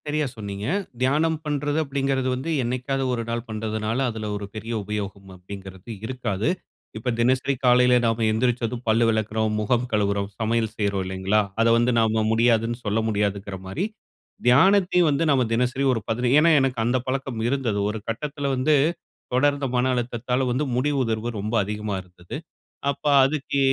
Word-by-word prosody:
சரியா 150 0 0
சொன்னீங்க. 100 0 -5 0.3
தியானம் 155 +5 +2
பண்றது 145 0 -1
அப்படிங்கறது 135 -2 -1
வந்து 130 +6 -4
என்னிக்காவது 130 +3 -1
ஒரு 115 -1 -2
நாள் 115 0 -2
பண்றதுனால, 110 +1 -2
அதுல 110 -2 -5
ஒரு 100 0 -4
பெரிய 110 +2 -5
உபயோகம் 100 -1 -5
அப்படிங்கறது 95 +2 -10 0.2
இருக்காது. 115 -4 -2 0.5
இப்ப 115 +3 -3
தினசரி 130 +3 +2
காலையில 125 0 +5
நம்ப 115 0 +1
எந்திருச்சதும் 120 +1 0
பல்லு 110 +1 +4
வெளக்குறோம், 110 0 0
முகம் 120 +3 +1
கழுவுறோம், 100 -2 0
சமையல் 110 0 0
செய்றோம் 100 -2 0
இல்லைங்களா? 95 +3 +1 0.2
அத 115 - +4
வந்து 120 +1 +3
நம்ப 110 -1 +2
முடியாதுனு 115 0 +2
சொல்ல 105 +2 +1
முடியாதுங்கற 100 -2 -1
மாரி, 155 - -2 0.6
தியானத்தையும் 180 +6 +5
வந்து 145 +3 +1
நாம 130 -3 +3
தினசரி 125 +3 0
ஒரு 115 - -1
பதினை 120 +2 0
ஏன்னா 165 +2 +5
எனக்கு 135 -2 0
அந்த 120 +2 +2
பழக்கம் 130 -2 -2
இருந்தது. 120 -6 0
ஒரு 110 - -3
கட்டத்துல 145 +5 -3
வந்து 140 +4 +3 0.6
தொடர்ந்த 140 +2 +2
மன 125 +1 +2
அழுத்தத்தால 125 +1 -1
வந்து 130 +5 0
முடி 135 +4 +1
உதர்வு 115 -1 -1
ரொம்ப 105 +3 -4
அதிகமா 105 0 -3
இருந்தது. 90 +2 -11 0.6
அப்ப 140 - -11 0.2
அதுக்கு 140 0 0
115 Hz, 150 wpm, -24 LUFS, 105-130 Hz, 0.6 s, காலையில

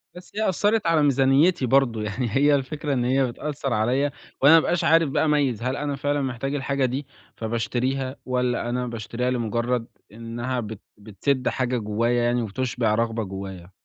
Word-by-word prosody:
بس 180 0 -12
هي 215 -2 +1
أثّرت 205 +1 +1
على 160 -3 +3
ميزانيتي 140 +4 +3
برضو، 125 -3 +2
يعني 105 +2 -2
هي 145 +1 +5
الفكرة 145 +2 -2
إن 125 -2 0
هي 130 +1 +2
بتأثّر 140 -1 -4
عليَّ 120 +6 +1 0.4
وأنا 145 +4 +8
ما - - +9
أبقاش 170 +2 +1
عارف 165 -2 +4
بقى 150 - +1
أميّز 145 -7 +1
هل 130 +1 -1
أنا 145 -1 -2
فعلًا 145 +1 -1
محتاج 135 +2 -3
الحاجة 140 -1 0
دي 130 +3 -2 0.3
فباشتريها، 125 +4 -2
ولا 125 -1 -1
أنا 125 0 -2
باشتريها 120 +2 -3
لمجرد 120 0 -1 0.3
إنّها 120 +3 -4
بت 110 -2 -6 0.2
بتسد 115 +6 -2
حاجة 125 -1 -1
جوايا 115 +3 0
يعني 120 0 +1
وتُشبع 115 0 -1
رغبة 115 -1 0
جوايا. 95 -2 -7
125 Hz, 170 wpm, -24 LUFS, 115-140 Hz, 0.4 s, ما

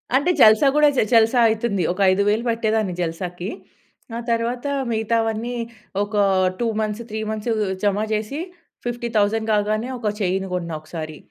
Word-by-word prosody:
అంటే 300 +7 +3
జల్సా 220 +5 +7
గూడా 300 0 +6
జే - - +4
జల్సా 230 +2 +5
అయితుంది. 220 -4 0
ఒక 180 - -6
5000 205 +4 +2
పట్టేదాన్ని 220 -4 0
జల్సాకి. 175 +2 -4 0.7
ఆ - - -3
తర్వాత 235 +3 -1 0.3
మిగతావన్నీ 225 +1 -1 0.5
ఒక 210 +1 -6 0.4
2 235 - 0
మంత్స్, 215 +1 -2
3 220 - -4
మంత్స్ 220 +2 -4 0.3
జమ 205 -1 +2 0.2
జేసి, 215 +8 -2 0.5
50,000 225 -2 0
కాగానే 215 +4 0
ఒక 210 -3 0
చైన్ 190 +1 0
గొన్నా 170 -2 -3
ఒకసారి. 155 -1 -7
220 Hz, 140 wpm, -22 LUFS, 200-230 Hz, 0.7 s, జల్సా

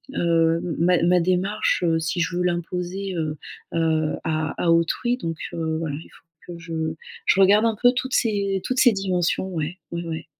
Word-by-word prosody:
heu, 165 -1 +2 0.2
ma 175 +1 +3
ma 180 0 +4
démarche, 185 +3 0
heu, 165 0 +2
si 160 +2 -2
je 170 +1 -1
veux 180 - +1
l'imposer, 180 +2 -2
heu 155 -2 -2 0.4
heu, 160 -2 +1
à 155 0 -1
à 170 - +3
autrui 170 +9 +1
donc, 165 -9 -4 0.2
heu, 160 -1 -2
voilà 155 -3 -3
il 160 - -10
faut 165 +1 -15
que 170 - -11
je 160 -1 -3 0.3
je 195 - +3
regarde 205 +3 +5
un 225 -1 +1
peu 245 - +6
toutes 260 +1 -2
ces 200 -4 0
toutes 255 0 -1
ces 245 - +7
dimensions, 190 -1 0
ouais, 165 0 -4
ouais, 170 0 -3
ouais. 165 -1 -5
170 Hz, 190 wpm, -23 LUFS, 165-190 Hz, 0.4 s, ces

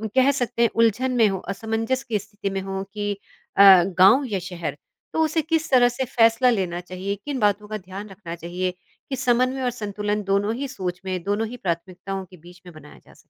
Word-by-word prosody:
कह 260 +1 +5
सकते 245 -3 -2
हैं 235 - +5
उलझन 230 +3 +2
में 225 -2 +6
हो, 195 -1 -1
असमंजस 225 +6 -2
की 225 -5 -1
स्थिति 205 -1 -6
में 195 0 -3
हो 195 0 -4
कि 205 -1 -2 0.5
अ, - - +7 0.2
गाँव 195 +9 +5
या 195 - 0
शहर, 175 -1 -5 0.4
तो 320 - +2
उसे 320 +1 +1
किस 320 0 -1
तरह 245 -2 +6
से 250 +2 -3
फ़ैसला 235 0 +4
लेना 185 -7 -1
चाहिए, 185 +2 -4
किन 285 -3 -3
बातों 210 -1 +1
का 215 0 -4
ध्यान 195 +2 -9
रखना 190 -3 -8
चाहिए, 175 +2 -3 0.4
कि 270 - -1
समन्वय 255 +1 +1
और 250 - +2
संतुलन 210 -2 -3
दोनों 200 +2 +1
ही 280 +3 -3
सोच 185 -8 -5
में, 185 -1 -2
दोनों 205 +3 -1
ही 245 +3 -8
प्राथमिकताओं 185 +1 -4
के 185 0 -16
बीच 175 +2 -16
में 175 - -11
बनाया 75 - -14
जा - - -18
सके? - - -23
205 Hz, 210 wpm, -23 LUFS, 185-245 Hz, 0.5 s, अ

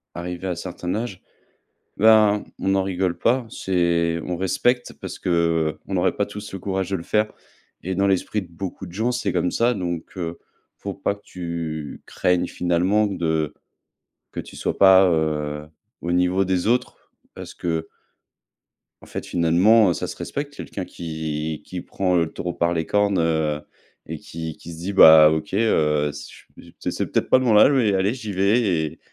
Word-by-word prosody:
arrivé 90 +2 -5
à 90 - -2
certains 90 +1 -4
âges, 110 -5 -4 0.8
ben, 110 -1 +5 0.2
on 95 - -1
n'en 95 -1 +2
rigole 95 -2 -1
pas. 125 +1 +1
C'est 85 -3 0
on 90 -1 -3
respecte 120 +7 0
parce - - -8
qu'on 85 -3 +1
n'aurait - - 0
pas - - 0
tous 105 0 -9
le 95 - -5
courage 95 0 -3
de 95 - +1
le 85 - -8
faire, 105 +4 +1 0.5
et 95 +1 -3
dans 100 +1 +2
l'esprit 100 +2 0
de 95 - -10
beaucoup 95 +2 -7
de 85 - -11
gens, 110 +6 0
c'est 105 -7 -2
comme 90 0 0
ça, 120 +1 +2
donc, 85 -4 -5
heu, 85 -1 -4 0.4
faut 100 - -5
pas 100 +1 -2
que 100 - -22
tu 85 -4 -5
craignes 90 -1 0
finalement 90 +5 +1
de 80 -5 -1 0.8
que - - -6
tu - - -13
sois - - -3
pas, 95 -1 +7
heu, 75 -2 -1 0.3
au 85 - -2
niveau 90 +2 +2
des 95 +1 0
autres 125 +2 -1 0.2
parce - - -9
que 80 -2 -2 1.1
en - - -14
fait, - - -6
finalement, 90 +6 +4
heu, - - +2
ça - - -4
se - - -7
respecte 145 0 -5
quelqu'un 95 -8 -6
qui 80 -2 -4
qui 90 -1 -6
prend, 95 -2 -1
heu, 85 - +3
le 80 - -9
taureau 90 0 -4
par 85 +1 0
les 80 -1 -1
cornes, 100 -2 +1
heu, 80 -2 0 0.5
et - - -5
qui 80 -1 -7
qui 85 - -10
se 80 - -9
dit: 95 +4 -4
«Bah, 80 -4 +9
OK, 80 +2 -3
heu, 75 -9 +2
c 75 0 -9 0.2
pff, - - -15
c'est - - -2
c'est - - -2
peut-être - - 0
pas 130 - +6
de - - -2
mon 110 -4 +4
âge, 135 - +7
mais 120 -7 +2
allez, 95 +3 +1
j'y 110 -5 -6
vais 100 +6 +2
et 80 -6 -1
90 Hz, 190 wpm, -23 LUFS, 85-100 Hz, 1.1 s, Bah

